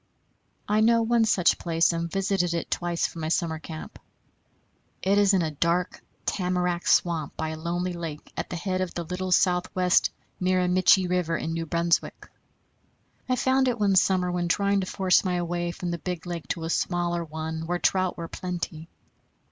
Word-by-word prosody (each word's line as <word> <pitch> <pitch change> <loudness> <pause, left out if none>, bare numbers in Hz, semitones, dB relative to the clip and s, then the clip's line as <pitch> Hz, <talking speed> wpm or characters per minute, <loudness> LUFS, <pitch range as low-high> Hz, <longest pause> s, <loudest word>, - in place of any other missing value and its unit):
I 210 +1 +2
know 230 +1 +4
one 230 0 +3
such 190 -5 +3
place, 165 0 +2
and 170 0 -2
visited 190 -2 0
it 170 - -4
twice 175 -1 0
from 165 - -5
my 155 - -2
summer 160 -1 0
camp. 160 0 -9 1.0
It 200 +2 +3
is 205 -1 +5
in 180 - +2
a 155 - -2
dark 170 +4 0 0.2
tamarack 180 -2 -1
swamp 165 -4 +1
by 160 - -2
a 160 - -4
lonely 175 +2 -2
lake 165 -3 -7
at - - -4
the - - -4
head 185 +2 -2
of 185 - -3
the 170 - -2
Little 180 +2 -4
South 180 0 +3
West 180 -1 +3 0.3
Miramichi 185 0 +3
River, 175 -2 0
in 165 - -3
New 165 0 -3
Brunswick. 170 +1 0 1.0
I 255 - +3
found 260 +1 +2
it 245 -2 0
one 200 -2 +3
summer 185 -1 +3
when 175 -1 -1
trying 200 +2 +2
to 185 - -4
force 185 -1 +3
my 180 -2 0
way 175 0 -2
from 175 0 -4
the 170 - -3
big 180 -1 -5
lake 170 -2 -5
to 165 - -3
a 165 - -3
smaller 175 -1 0
one, 160 0 -5
where 175 +1 0
trout 185 +1 +1
were 170 - -5
plenty. 170 -2 -5
175 Hz, 185 wpm, -26 LUFS, 170-185 Hz, 1.0 s, is